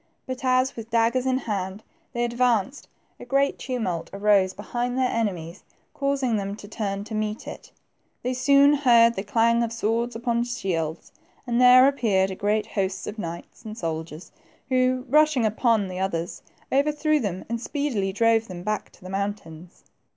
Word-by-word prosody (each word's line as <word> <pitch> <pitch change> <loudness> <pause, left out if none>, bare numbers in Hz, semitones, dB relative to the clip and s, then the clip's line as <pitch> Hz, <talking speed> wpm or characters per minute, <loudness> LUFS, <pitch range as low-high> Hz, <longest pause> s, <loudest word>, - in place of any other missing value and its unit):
But 260 +1 -6
as, 255 +1 +2
with 225 -1 -8
daggers 235 +3 +2
in 260 0 +2
hand, 200 -4 -4 0.3
they 240 -2 -1
ad 240 - -3
vanced, 240 0 0 0.3
a - - -9
great 275 +3 +1
tumult 205 -10 -3
arose 200 -1 +3
behind 240 +5 -3
their 260 -1 +2
enemies, 185 -6 -3 0.3
causing 275 -5 0
them 200 0 -3
to 205 - -11
turn 200 -2 -3
to 220 - -9
meet 215 0 -3
it. - - -9 0.5
They 250 +1 -1
soon 280 +3 +5
heard 235 -5 +5
the 195 - -3
clang 230 +3 +2
of 230 -1 -1
swords 230 +1 -1
upon 235 0 0
shields, 170 -9 -3 0.3
and 240 -1 +1
there 250 +1 +8
appeared 205 -9 +1
a - - -5
great 210 +2 0
host 190 -1 -3
of 215 - -6
knights 170 +6 -7
and 215 -1 -8
soldiers, 160 -2 -5 0.4
who, 255 0 +1
rushing 300 -3 +4
upon 220 -1 +2
the 185 0 -6
others, 175 -3 -3 0.3
overthrew 300 +2 +2
them 195 -7 -4
and 230 0 -3
speedily 250 -10 -2
drove 225 +2 +2
them 175 -2 -8
back 215 +2 -2
to - - -21
the 185 - -8
mountains. 195 -4 -5
225 Hz, 170 wpm, -25 LUFS, 195-255 Hz, 0.5 s, there